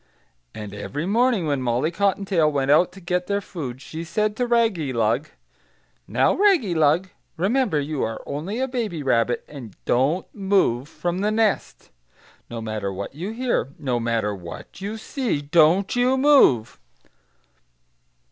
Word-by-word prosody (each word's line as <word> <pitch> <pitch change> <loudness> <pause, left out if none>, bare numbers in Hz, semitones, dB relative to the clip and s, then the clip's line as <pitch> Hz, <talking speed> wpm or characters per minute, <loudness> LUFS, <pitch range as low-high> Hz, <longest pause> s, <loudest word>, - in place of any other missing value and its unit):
And 105 -2 -7
every 140 +10 -4
morning, 230 -1 +2
when 145 -3 0
Molly 125 +6 0
Cottontail 190 -4 +1
went 140 -1 +1
out 175 +4 +4
to 195 - -12
get 180 0 -2
their 200 0 0
food, 135 -10 -7
she 160 +1 -6
said 210 +5 -1
to 245 +1 -1
Raggylug, 155 - +1 0.8
'Now, - - +2
Raggylug, 185 - +3 0.3
remember 200 - +1
you 145 0 -3
are 110 0 -3
only 165 +10 -4
a 265 - 0
baby 225 - -3
rabbit, 120 -2 +1
and 125 -9 -10
don't 140 +9 +1
move 190 - +1
from 175 +1 -3
the 205 +2 +1
nest. 215 -1 -1 0.6
No 115 -1 -5
matter 110 -3 -3
what 100 +5 -6
you 170 +8 -5
hear, 230 - -1
no 125 -4 -1
matter 115 -3 0
what 90 - -10
you 205 +3 -4
see, 235 - -2
don't 165 +7 +3
you 250 +2 +3
move!'" 260 - +4
165 Hz, 145 wpm, -23 LUFS, 130-210 Hz, 0.8 s, out